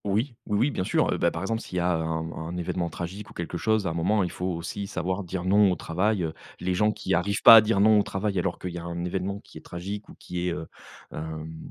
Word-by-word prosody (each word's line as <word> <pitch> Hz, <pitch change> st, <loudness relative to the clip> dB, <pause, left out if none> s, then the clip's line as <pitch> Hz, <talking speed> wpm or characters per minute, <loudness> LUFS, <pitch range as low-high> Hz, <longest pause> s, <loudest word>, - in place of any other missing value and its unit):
Oui, 110 Hz, +6 st, 0 dB
oui, 105 Hz, -, +1 dB
oui, 125 Hz, +7 st, +2 dB
bien 95 Hz, -, -2 dB
sûr. -, -, +2 dB
Heu, -, -, -1 dB
bah, 85 Hz, -, +3 dB
par 85 Hz, +1 st, -5 dB
exemple, 115 Hz, +3 st, -1 dB
s'il 90 Hz, -, -6 dB
y -, -, +3 dB
a 90 Hz, +1 st, +2 dB
un 80 Hz, 0 st, -2 dB
un 85 Hz, +2 st, -5 dB
événement 85 Hz, 0 st, -2 dB
tragique 95 Hz, +5 st, -6 dB
ou -, -, -13 dB
quelque 85 Hz, 0 st, -4 dB
chose, 110 Hz, -2 st, +1 dB
un 80 Hz, -, -1 dB
moment, 95 Hz, +5 st, +2 dB
il 90 Hz, -, -2 dB
faut 90 Hz, -, -3 dB
aussi 90 Hz, +3 st, -4 dB
savoir 95 Hz, 0 st, -2 dB
dire: 90 Hz, 0 st, -4 dB
«Non» 100 Hz, +1 st, +5 dB
au -, -, +1 dB
travail. 95 Hz, +4 st, 0 dB
Heu, 80 Hz, -1 st, -2 dB, 0.3 s
les 90 Hz, +1 st, -1 dB
gens 105 Hz, +4 st, +3 dB
qui -, -, -3 dB
arrivent 100 Hz, +5 st, 0 dB
pas 115 Hz, -, +12 dB
à 110 Hz, -, +10 dB
dire: 105 Hz, -2 st, +1 dB
«Non» 105 Hz, +1 st, +6 dB
au -, -, +5 dB
travail 100 Hz, -1 st, -1 dB
alors 90 Hz, 0 st, -1 dB
qu'il 90 Hz, -, -5 dB
y 85 Hz, -, -5 dB
a -, -, -8 dB
un 85 Hz, 0 st, -4 dB
événement 95 Hz, +2 st, -2 dB
qui -, -, -12 dB
est -, -, -18 dB
tragique 100 Hz, +4 st, -6 dB
ou -, -, -12 dB
qui 90 Hz, 0 st, -4 dB
est, 90 Hz, -, 0 dB
heu, 80 Hz, -, -5 dB, 0.5 s
hem, 80 Hz, +1 st, -6 dB
90 Hz, 275 wpm, -26 LUFS, 85-100 Hz, 0.5 s, pas